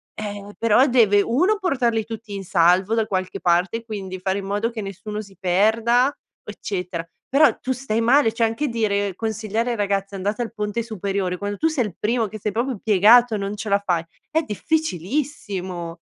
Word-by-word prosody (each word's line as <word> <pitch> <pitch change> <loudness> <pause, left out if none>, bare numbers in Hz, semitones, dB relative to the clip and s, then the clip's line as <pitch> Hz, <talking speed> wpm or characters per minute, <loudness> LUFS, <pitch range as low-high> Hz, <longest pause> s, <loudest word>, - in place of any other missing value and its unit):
ehm, 205 -1 -6
però 230 +3 +4
deve: 220 -5 +4
1 345 - +2
portarli 245 - 0
tutti 225 -1 -8
in 195 -1 -5
salvo 180 +4 +3
da 225 -1 +1
qualche 185 -2 -3
parte, 180 +7 +1
quindi 195 -4 -6
fare 190 +2 -1
in 195 - -7
modo 205 +3 -1
che 230 -2 -5
nessuno 205 +2 -6
si 195 -2 -15
perda, 225 +8 +3 0.3
eccetera, 180 -4 -5 0.2
però 280 -2 +5
tu 260 - -3
stai 245 -3 -1
male 245 +1 +4
cioè 230 0 +2
anche 225 +7 -2
dire 205 -5 0
consigliare 220 +2 -2
ai - - -1
ragazzi 200 -1 -1
andate 205 +4 -2
al 230 -1 -4
ponte 210 +1 -2
superiore, 195 -4 -2
quando 205 +1 -4
tu 320 - +2
sei 305 -7 0
il 195 -5 -7
primo 230 +1 +1
che 215 +2 -8
sei 210 +1 -2
proprio 235 +1 -2
piegato 220 +3 +6
e - - -1
non 200 +1 -3
ce 215 +1 -5
la 200 0 +3
fai, 180 -5 0 0.3
è 320 0 +2
difficilissimo. 200 - -3
210 Hz, 185 wpm, -22 LUFS, 195-235 Hz, 0.3 s, piegato